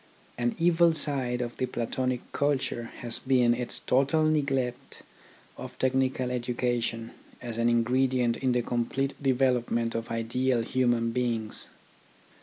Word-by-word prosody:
An 120 0 -1
evil 170 0 +4
side 130 -5 +1
of 120 0 -6
the 130 - -1
Platonic 125 +1 -2
culture 140 -4 -1 0.2
has 120 -2 -3
been 125 -2 +3
its 120 0 -2
total 140 +5 +2
neglect 135 -5 -1 0.5
of - - -9
technical 130 -1 0
education 120 -2 -2 0.3
as 120 -2 -6
an 115 0 +3
ingredient 125 +1 +2
in 130 -1 0
the 120 -1 +1
complete 130 +4 -1
development 125 -3 +1
of 115 0 -4
ideal 120 +2 0
human 120 -1 +1
beings. 115 -3 -2
125 Hz, 125 wpm, -28 LUFS, 120-130 Hz, 0.5 s, evil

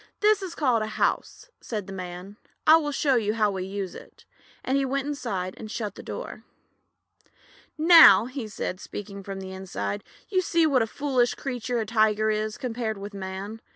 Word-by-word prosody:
"This 420 -1 +4
is 370 -3 -6
called 250 -7 +2
a 215 - -2
house," - - -2
said 210 -4 -5
the 195 - -8
Man. 185 +2 -7 0.3
"I 315 +1 +8
will 295 -2 -2
show 280 -1 +1
you 215 -1 0
how 210 -2 +2
we 190 -1 -4
use 195 -1 -4
it," - - -14 0.4
and 260 - 0
he 275 - +2
went 275 +1 -1
inside 200 -11 -3
and 215 - -8
shut 210 -3 -4
the - - -10
door. - - -7 1.3
"Now," 325 -6 +8 0.2
said 205 -3 -4
he, - - -24
speaking 200 -1 -7
from 195 0 -6
inside, 190 - -5 0.2
"you 375 -2 +1
see 335 -2 +2
what 275 -5 +3
a 225 - +1
foolish 255 -1 0
creature 245 -2 -3
a 220 - -1
Tiger 215 0 +2
is 215 0 -2
compared 230 -3 -3
with 200 +1 -8
Man. 195 +3 -6
220 Hz, 185 wpm, -26 LUFS, 195-270 Hz, 1.3 s, I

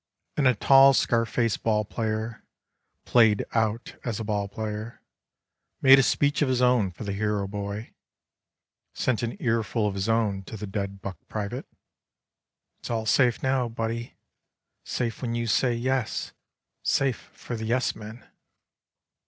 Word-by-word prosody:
And 140 -3 +3
a 125 - +4
tall 135 +4 +7
scar 115 -1 +2
face 115 -3 0
ball 105 -1 0
player. 110 +1 -3 0.6
Played 110 -4 +4
out 110 0 -1
as 115 -3 -3
a - - -3
ball 105 -2 -1
player. 110 +2 -6 0.8
Made 135 0 +8
a - - +6
speech 145 +4 +1
of 145 - +2
his 130 -1 +1
own 125 -5 +3
for 90 - -9
the 100 -1 -3
hero 105 -1 -1
boy, 100 +2 -5 1.0
Sent 125 -4 0
an 120 -1 -3
earful 115 -2 0
of 100 - -2
his 100 +3 -2
own 110 -4 +1
to 110 - -8
the 105 - -5
dead 100 -1 -4
buck 95 -2 -6
private: 110 +5 -4 0.6
" - - -56
It's - - -8
all 115 -2 -1
safe 120 +1 +3
now, 130 -2 +1
buddy. 115 +1 -4 0.7
Safe 120 -2 -3
when 120 -2 -2
you 120 0 -1
say 120 +2 +2
yes. 130 0 -1 0.5
Safe 135 -4 0
for 120 - -7
the 110 0 -4
yes 125 +3 +1
men." 110 +2 -10
115 Hz, 155 wpm, -26 LUFS, 105-125 Hz, 1.0 s, Made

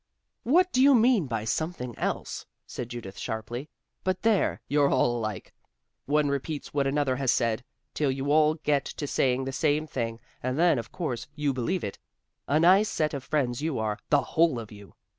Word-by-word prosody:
"What 360 +9 +3
do 255 - +2
you 275 0 +7
mean 230 - +4
by 110 -3 -3
'something 125 -2 -3
else'?" - - -3 0.2
said 120 - -6
Judith 115 -5 -7
sharply. 115 +6 -5 0.3
"But 185 0 -1
there 220 -3 +2
you're 145 -1 +3
all 125 -2 +2
alike. 110 -4 -4 0.5
One 150 +1 +2
repeats 140 +2 -3
what 140 -1 +1
another 135 -2 +1
has 135 -2 +2
said, 115 0 0 0.3
till 150 -2 0
you 135 +2 -1
all 155 0 +4
get 150 -3 0
to 145 - -5
saying 130 -2 +1
the 135 - -3
same 145 +4 +1
thing 115 -6 -3 0.2
and 130 +2 -2
then 165 -5 +4
of 115 - -8
course 130 -9 -4
you 145 -2 0
believe 160 +9 -1
it. 100 - -5 0.5
A 150 - +3
nice 190 +6 +5
set 155 -1 0
of 140 -2 -4
friends 135 -4 -1
you 155 -3 -1
are 110 -1 -2
the 145 -1 +4
whole 160 -6 +2
of 110 -2 -9
you. 100 -1 -13
140 Hz, 190 wpm, -27 LUFS, 120-155 Hz, 0.5 s, you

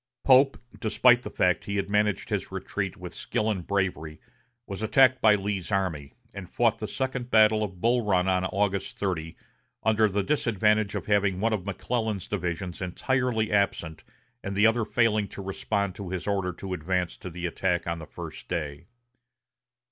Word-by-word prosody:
Pope, 135 +1 +5 0.2
despite 120 +2 +4
the - - -6
fact 90 -1 +1
that - - -10
he - - -1
had 100 - -1
managed 105 -1 0
his - - -2
retreat - - -4
with - - -8
skill 110 +1 -1
and 95 -5 -4
bravery, 90 -6 -2 0.5
was 100 0 -6
attacked 130 +3 +4
by 105 -1 +6
Lee's 100 -3 -3
army, 80 -8 -1 0.2
and 100 -2 -8
fought 115 -2 +1
the 110 - -4
second 130 -1 -3
battle 110 -1 +5
of 95 -4 -6
Bull 120 +1 +2
Run 95 -3 +2
on 95 -1 +2
August 100 0 -1
30, 85 -4 -3 0.5
under 110 0 +4
the 100 0 0
disadvantage 105 -4 +1
of - - -3
having 100 -3 +2
one 115 +2 +1
of 100 -2 -3
McClellan's 110 +1 -2
divisions 90 -2 -3
entirely 115 +4 0
absent 100 -6 0 0.4
and 100 0 -4
the 105 +2 +4
other 115 0 +3
failing 110 -2 +2
to 100 - -9
respond 100 0 -2
to 95 -1 -7
his 90 -1 -4
order 100 -3 0
to 95 +2 -6
advance 90 +1 -1
to 90 - -8
the 90 +1 -6
attack 85 0 -1
on 85 0 -3
the 80 - -9
first - - -9
day. 75 -1 -4
100 Hz, 180 wpm, -27 LUFS, 90-110 Hz, 0.5 s, by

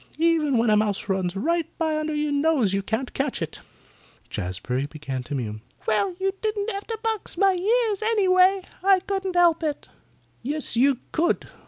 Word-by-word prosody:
Even 315 -5 +2
when 230 -1 +3
a - - +5
mouse 210 -2 0
runs 190 -2 -1
right 330 - 0
by 320 -1 0
under 310 0 -2
your 295 0 0
nose 285 -8 +2
you 195 - +1
can't 220 +6 -3
catch 270 -1 -2
it." 165 - -4 0.7
Jazbury 125 +10 -3
began 140 -4 -5
to 125 +4 -5
mew. 110 -4 -4 0.2
"Well, 350 - +1
you 385 0 0
don't 430 0 -1
have 400 0 -6
to 450 - -3
box 445 -2 -2
my 390 -1 +4
ears, 425 +3 +1
anyway. 385 -3 +3 0.2
I 385 -1 +5
couldn't 385 -1 -3
help 345 -2 +4
it." 300 -2 -3 0.5
"Yes, 290 +1 0
you 265 +2 +4
could. 340 +3 0
310 Hz, 175 wpm, -24 LUFS, -, 0.7 s, a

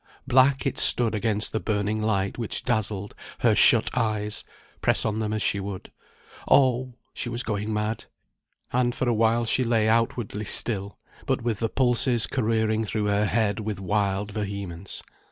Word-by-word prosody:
Black 130 +1 +3
it 135 - -1
stood 115 -3 +4
against 105 0 -1
the 110 - -1
burning 105 0 -1
light 100 -1 -1
which 115 - -3
dazzled 105 -3 -2 0.3
her - - +4
shut - - +5
eyes, 105 -3 -1 0.4
press - - +2
on 110 0 -1
them 110 -1 -2
as 110 0 -1
she 100 - +1
would. 100 -1 -7 0.6
Oh! 130 -2 +3 0.2
she 120 - -4
was 120 +1 -3
going 105 0 -3
mad; 105 +1 -2 0.7
and 120 -1 +1
for 130 - -2
awhile 115 0 +2
she 130 +3 +1
lay 115 -2 +1
outwardly 115 -1 0
still, 100 -2 0 0.3
but - - 0
with 115 -4 -1
the 115 - -1
pulses 125 -2 +1
careering 110 -2 0
through 105 0 -2
her 105 0 +1
head 105 -1 0
with 105 -3 -4
wild 100 +1 -1
vehemence. 100 -3 -6
110 Hz, 160 wpm, -25 LUFS, 105-120 Hz, 0.7 s, shut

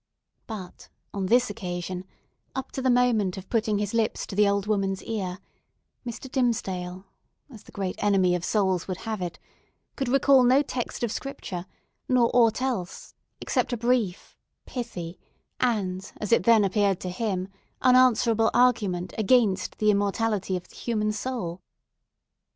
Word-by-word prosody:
But, 200 -5 -8 0.2
on 195 -2 -2
this 245 +4 +3
occasion, 180 -2 -5 0.5
up 265 0 -4
to 265 - -4
the 260 - +2
moment 240 -7 +2
of 190 0 -10
putting 220 -2 +1
his 205 +1 -2
lips 230 -1 0
to 195 - -8
the 205 0 +4
old 200 0 0
woman's 195 -2 -1
ear, 190 -5 -3 0.7
Mr. 235 +3 -6
Dimmesdale, 190 -8 -1 0.5
as 220 -5 -11
the - - -17
great 190 -2 -4
enemy 190 -3 +3
of 175 -1 -1
souls 190 -4 +1
would 185 -1 -4
have 220 -3 -3
it, 175 -1 -4 0.6
could 270 -3 -2
recall 270 0 +5
no 260 +4 +5
text 250 -3 -4
of 235 - 0
Scripture, 190 -10 -5 0.4
nor 245 -2 +4
aught 235 0 +4
else, 230 -9 -3 0.3
except - - -1
a - - 0
brief, 235 -5 0 0.3
pithy, 180 -9 -6 0.4
and, 190 -6 -1
as 210 - -4
it 230 - +4
then 230 -3 +6
appeared 195 -1 +2
to 185 - -3
him, 185 -2 -2 0.4
unanswerable 235 -3 +5
argument 205 -8 +2
against 215 -4 +2
the 215 -1 +4
immortality 200 -1 0
of 180 - -10
the - - -19
human 215 -3 -1
soul. 205 -6 -4
210 Hz, 150 wpm, -26 LUFS, 185-240 Hz, 0.7 s, then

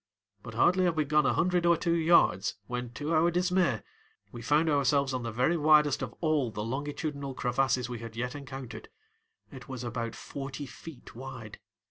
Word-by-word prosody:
But - - -9
hardly 185 +1 +4
had 175 -2 +1
we 155 -1 +1
gone 150 0 +3
a - - +2
hundred 180 0 +2
or 170 -1 +4
two 170 +1 0
yards 165 - +3
when 125 +2 -4
to 150 +5 -3
our 165 +2 +4
dismay 180 +1 +1 0.5
we 120 - -8
found 150 +7 +2
ourselves 140 -2 +2
on 130 - -2
the 115 -1 -4
very 125 +10 +1
widest 150 -2 +4
of 130 -3 -3
all 155 -6 +1
the 105 -1 -5
longitudinal 140 +2 -4
crevasses 125 0 0
we 120 -2 -6
had 115 -1 -9
yet 125 +2 -3
encountered. 135 -3 -8 0.6
It 130 +1 -11
was 130 -2 -5
about 115 -1 -4
forty 140 +1 -6
feet 145 +2 -12
wide. 120 -3 -9
140 Hz, 180 wpm, -29 LUFS, 125-155 Hz, 0.6 s, hardly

